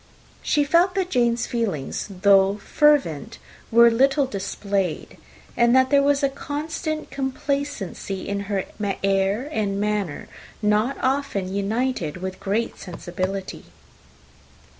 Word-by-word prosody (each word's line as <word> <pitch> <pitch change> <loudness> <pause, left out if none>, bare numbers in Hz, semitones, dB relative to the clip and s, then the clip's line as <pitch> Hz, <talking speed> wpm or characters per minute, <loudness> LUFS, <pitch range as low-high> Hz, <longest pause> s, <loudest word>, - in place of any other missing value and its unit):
She 295 - +2
felt 340 +5 +3
that 375 -2 -1
Jane's 240 -1 +2
feelings, 205 - -3 0.2
though 195 0 +5
fervent, 230 - +2 0.3
were 235 +1 +7
little 270 +4 +3
displayed, 200 -5 -3 0.4
and 235 +1 +4
that 260 +1 +4
there 280 -1 +6
was 285 0 +2
a 275 - +4
constant 310 +3 -4
complacency 265 -8 -3
in 200 0 -2
her 195 -2 -1 0.4
air 195 +5 +1
and 200 -6 -1
manner, 205 -6 -2 0.3
not 215 +5 +1
often 260 -9 -1
united 200 - -1
with 185 +1 -6
great 215 +4 -2
sensibility. 185 +2 -5
230 Hz, 115 wpm, -23 LUFS, 195-275 Hz, 0.4 s, were